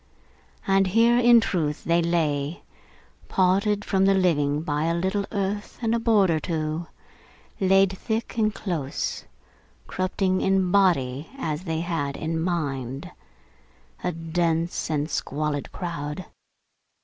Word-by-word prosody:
And 195 -1 +3
here, 230 +5 +4
in 240 -1 +7
truth, 155 -8 -1
they 170 +1 +2
lay, 160 -3 -1 0.6
parted 200 +3 +2
from 195 -1 +2
the 195 0 +4
living 150 -5 +2
by 150 -1 -1
a 165 0 +1
little 190 +3 -1
earth 205 0 -3
and 230 -1 0
a 235 - +2
board 215 -6 +3
or 160 - +1
two 160 0 -3 0.7
lay 195 0 +5
thick 220 +4 -4
and 215 -2 +2
close 165 -10 -3 0.6
corrupting 185 0 0
in 190 -2 +2
body 155 -8 +2
as 160 - -3
they 160 -1 -1
had 165 -5 -2
in 160 0 -2
mind 140 -7 -3 0.9
a 180 - 0
dense 165 0 -1
and 150 -1 0
squalid 150 -2 -3
crowd. 165 -1 -5
175 Hz, 125 wpm, -25 LUFS, 155-195 Hz, 0.9 s, in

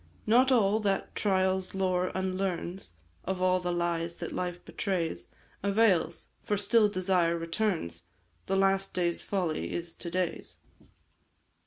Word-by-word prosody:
"Not 250 +4 +5
all 215 -4 +4
that 200 -3 -1
trial's 190 -2 +1
lore 185 -1 +1
unlearns 185 - -2 0.3
Of 190 0 -2
all 185 0 +3
the 180 -1 -2
lies 170 -1 -1
that - - -6
life 175 -1 -4
betrays, 180 -5 -2 0.3
Avails, 195 -5 +2
for 210 -3 -1
still 210 +1 +4
desire 180 -3 +1
returns 165 - -2 0.4
The 195 - +1
last 195 0 +2
day's 175 -2 0
folly 180 -6 -2
is 170 -1 -4
to 170 - -6
day's. 180 0 -2
185 Hz, 130 wpm, -29 LUFS, 175-195 Hz, 0.4 s, Not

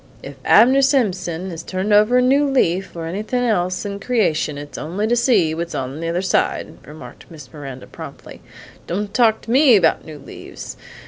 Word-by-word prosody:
"If 140 - -8
Abner 255 +5 +5
Simpson 190 - 0
is 165 -1 -7
turnin' 190 +4 -2
over 215 +4 +5
a - - +4
leaf, 255 -10 +1
or 165 -1 -5
anythin' 215 +8 -3
else 185 -5 -1
in 200 0 -5
creation, 185 - 0
it's 145 0 -9
only 180 +7 -3
to 235 +2 +1
see 220 -10 +2
what's 170 +1 -5
on 135 +3 -4
the 165 - -4
under 175 +2 -1
side!" 190 - -1
remarked 155 +4 -12
Miss 150 -7 -13
Miranda 135 -4 -9
promptly. - - -11 0.5
"Don't 200 +3 -3
talk 225 -2 +3
to 225 - -7
me 265 -1 +6
about 170 -5 +2
new 155 -2 -10
leaves! 140 - -10
190 Hz, 180 wpm, -20 LUFS, 165-230 Hz, 0.5 s, me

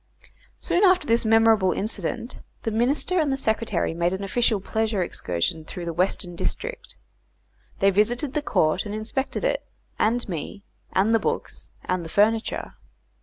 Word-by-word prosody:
Soon 360 - +1
after 370 -4 +5
this 230 -2 +2
memorable 220 -3 +5
incident, 220 +4 -2 0.2
the 225 - -1
Minister 275 +11 +1
and 285 -4 +1
Secretary 220 -8 0
made 170 +2 0
an 190 +1 -3
official 220 +1 +1
pleasure 220 0 0
excursion 90 - -2
through 175 +2 -7
the 170 - -3
Western 180 +1 0
District. - - -3 0.8
They 195 0 +4
visited 240 +8 +1
the 300 - 0
court 155 - +1
and 205 - -4
inspected 235 - -3
it, - - 0 0.4
and 240 +3 +2
me, 190 +3 -5 0.3
and 205 +4 +3
the 225 - +5
books, - - -3 0.2
and 180 -1 -1
the 165 - -7
furniture. 220 +5 +1
215 Hz, 150 wpm, -25 LUFS, 185-240 Hz, 0.8 s, after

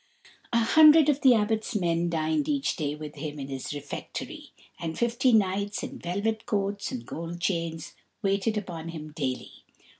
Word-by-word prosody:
A 235 - +3
hundred 305 +6 +7
of 290 0 +2
the 260 -3 +7
Abbot's 220 +1 0
men 170 -3 +1
dined 160 - 0
each 285 -2 0
day 150 -3 -2
with 150 -1 -8
him 150 0 -6
in 140 -1 -6
his 135 -1 -5
refectory, 145 -1 -6 0.3
and 160 -1 -4
fifty 240 +2 +2
knights 200 -1 +1
in - - -6
velvet 205 +5 -2
coats 200 -1 -1
and 120 -2 -5
gold 170 +5 -6
chains 165 -3 -2 0.3
waited 200 +2 +1
upon 170 -5 -5
him 155 -2 -7
daily. 135 -5 -4
185 Hz, 160 wpm, -27 LUFS, 160-225 Hz, 0.3 s, hundred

